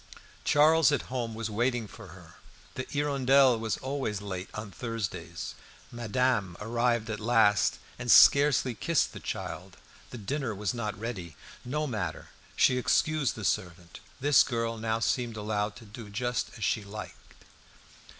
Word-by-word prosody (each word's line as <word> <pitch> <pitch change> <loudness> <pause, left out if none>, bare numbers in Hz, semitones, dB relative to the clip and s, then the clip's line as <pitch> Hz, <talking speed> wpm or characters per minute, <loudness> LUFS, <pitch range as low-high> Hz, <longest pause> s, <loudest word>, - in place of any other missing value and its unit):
Charles 155 +1 +5
at 140 -2 -2
home 115 -3 -2
was 115 -1 -4
waiting 120 +1 0
for 115 0 -12
her; 85 -1 -14 0.4
the 130 - -5
"Hirondelle" 135 -3 +3
was 110 -1 -2
always 130 -6 -3
late 95 -2 -6
on 105 -1 -6
Thursdays. 95 -8 -5 0.4
Madame 120 -5 0
arrived 115 +1 0
at 105 - -4
last, 110 -2 +3 0.2
and 120 -1 0
scarcely 140 +4 +6
kissed 165 +6 0
the - - -8
child. - - -6 0.3
The 125 - -8
dinner 125 +1 -3
was 100 -1 -2
not 105 -5 -4
ready. 95 - -6 0.3
No 150 +5 -2
matter! 105 - -4 0.3
She 125 - +4
excused 155 +1 +1
the 110 - -6
servant. 85 -1 -3 0.2
This 140 -2 +5
girl 115 -1 -1
now 110 0 0
seemed 115 0 -1
allowed 105 0 -2
to 115 - -13
do 105 +1 -10
just 120 +4 -2
as 110 - -6
she 110 +2 0
liked. 105 +2 -10
115 Hz, 150 wpm, -29 LUFS, 105-125 Hz, 0.4 s, scarcely